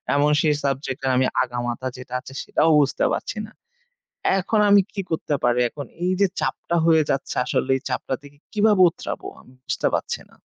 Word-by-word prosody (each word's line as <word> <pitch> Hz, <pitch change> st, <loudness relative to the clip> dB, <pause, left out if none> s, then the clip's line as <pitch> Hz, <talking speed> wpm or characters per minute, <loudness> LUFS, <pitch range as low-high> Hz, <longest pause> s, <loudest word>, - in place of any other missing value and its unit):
এবং 145 Hz, +1 st, +3 dB
সেই 150 Hz, -2 st, +2 dB
subject 135 Hz, 0 st, -2 dB
এর -, -, +2 dB
আমি 130 Hz, -, +3 dB, 0.2 s
আগামাথা 120 Hz, +1 st, -3 dB
যেটা 125 Hz, 0 st, -10 dB
আছে 135 Hz, -, -12 dB
সেটাও 160 Hz, -, +2 dB
বুঝতে 140 Hz, -1 st, +1 dB
পারছি -, -, -4 dB
না। -, -, -17 dB, 0.9 s
এখন 210 Hz, +3 st, 0 dB
আমি 200 Hz, 0 st, +7 dB
কি 200 Hz, -, -2 dB
করতে 155 Hz, -2 st, -1 dB
পারি? 120 Hz, 0 st, +3 dB
এখন 145 Hz, +2 st, -7 dB, 0.2 s
এই 180 Hz, -, +2 dB
যে 200 Hz, -, +6 dB
চাপটা 170 Hz, -, -2 dB
হয়ে 160 Hz, -2 st, +5 dB
যাচ্ছে, 135 Hz, -, -1 dB
আসলে 130 Hz, -, -1 dB
এই -, -, -11 dB
চাপটা 130 Hz, +1 st, -2 dB
থেকে 145 Hz, 0 st, -16 dB, 0.2 s
কিভাবে 210 Hz, -2 st, +4 dB
উতরাবো -, -, -6 dB
আমি 125 Hz, -, -20 dB
বুঝতে -, -, 0 dB
পারছি -, -, -1 dB
না। -, -, -22 dB
145 Hz, 190 wpm, -23 LUFS, 130-170 Hz, 0.9 s, আমি